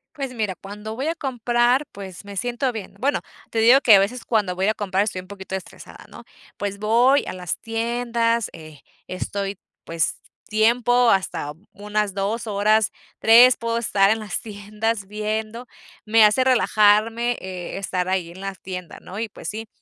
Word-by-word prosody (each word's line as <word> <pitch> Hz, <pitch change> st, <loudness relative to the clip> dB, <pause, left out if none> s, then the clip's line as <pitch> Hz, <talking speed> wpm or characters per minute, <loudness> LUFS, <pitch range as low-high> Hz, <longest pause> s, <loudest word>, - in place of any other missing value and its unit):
Pues 270 Hz, -3 st, -5 dB
mira, 215 Hz, -5 st, -2 dB
cuando 210 Hz, +3 st, -8 dB
voy 270 Hz, +5 st, -3 dB
a 330 Hz, -, 0 dB
comprar, 245 Hz, -1 st, +1 dB
pues 195 Hz, -1 st, -9 dB
me 200 Hz, -1 st, -9 dB
siento 245 Hz, +4 st, -1 dB
bien. 215 Hz, -4 st, -8 dB
Bueno, 280 Hz, +5 st, 0 dB, 0.3 s
te 225 Hz, -, 0 dB
digo 245 Hz, +5 st, +7 dB
que 230 Hz, -5 st, +7 dB
a 195 Hz, -, +9 dB
veces 225 Hz, +5 st, -2 dB
cuando 205 Hz, -6 st, 0 dB
voy 190 Hz, -, 0 dB
a 215 Hz, -, +2 dB
comprar 195 Hz, -1 st, 0 dB
estoy 195 Hz, -3 st, -3 dB
un 185 Hz, -, -15 dB
poquito 190 Hz, -1 st, -8 dB
estresada, 190 Hz, -, -9 dB
¿no? -, -, -13 dB, 0.3 s
Pues 200 Hz, -1 st, -4 dB
voy 240 Hz, +7 st, +3 dB
a -, -, -4 dB
las 180 Hz, -2 st, -4 dB
tiendas, 230 Hz, 0 st, -1 dB
eh, 155 Hz, -3 st, -12 dB, 0.3 s
estoy 195 Hz, +1 st, -4 dB, 0.3 s
pues 165 Hz, -1 st, -1 dB, 0.3 s
tiempo, 235 Hz, +2 st, +3 dB
hasta 170 Hz, -6 st, 0 dB, 0.2 s
unas 210 Hz, -1 st, -2 dB
2 205 Hz, +4 st, -2 dB
horas, 215 Hz, 0 st, +2 dB, 0.3 s
3, 240 Hz, +3 st, +7 dB
puedo 230 Hz, 0 st, -1 dB
estar 200 Hz, -4 st, +3 dB
en 225 Hz, -, +2 dB
las 210 Hz, -4 st, -4 dB
tiendas 210 Hz, 0 st, -3 dB
viendo, 215 Hz, +3 st, -4 dB, 0.4 s
me 220 Hz, 0 st, +6 dB
hace 210 Hz, +5 st, +4 dB
relajarme, 230 Hz, -1 st, +3 dB, 0.4 s
estar 185 Hz, -2 st, -2 dB
ahí 185 Hz, -3 st, -1 dB
en 180 Hz, -, -12 dB
la 195 Hz, 0 st, -4 dB
tienda, 180 Hz, -2 st, -8 dB
¿no? 195 Hz, +3 st, -9 dB
Y 225 Hz, -, -2 dB
pues -, -, -9 dB
sí, 220 Hz, +1 st, -5 dB
215 Hz, 175 wpm, -22 LUFS, 195-235 Hz, 0.4 s, a